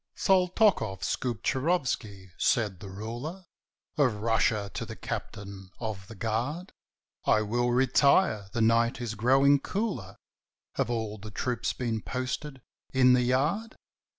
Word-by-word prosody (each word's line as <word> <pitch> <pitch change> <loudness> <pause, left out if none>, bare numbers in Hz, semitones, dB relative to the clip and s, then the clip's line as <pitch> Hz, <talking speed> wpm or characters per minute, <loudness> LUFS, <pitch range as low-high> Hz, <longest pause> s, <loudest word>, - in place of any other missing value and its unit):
_" - - -16
"SALTOKOFF 180 - +3
SKUPCHIROFSKY," 125 - -1
said 105 -8 +1
the 100 - -9
ruler 120 - -6 0.5
Of 130 -6 +3
Russia 105 -2 +1
to - - -3
his - - -8
captain 100 -2 -6
of 105 -5 -5
the 115 - -10
guard, 120 - -3 0.5
"I 110 - +4
will 120 +3 0
retire; 130 - +3
the 115 +1 -1
night 115 +1 +3
is 120 -3 -3
growing 135 +6 +4
cooler 140 - -3 0.6
Have - - -1
all 110 -3 -3
the 110 +2 -8
troops 120 +4 -2
been 115 -3 -2
posted 130 +2 -4 0.3
in 125 -1 +5
the 125 - +4
yard?" 150 - 0
120 Hz, 130 wpm, -28 LUFS, 110-135 Hz, 0.6 s, in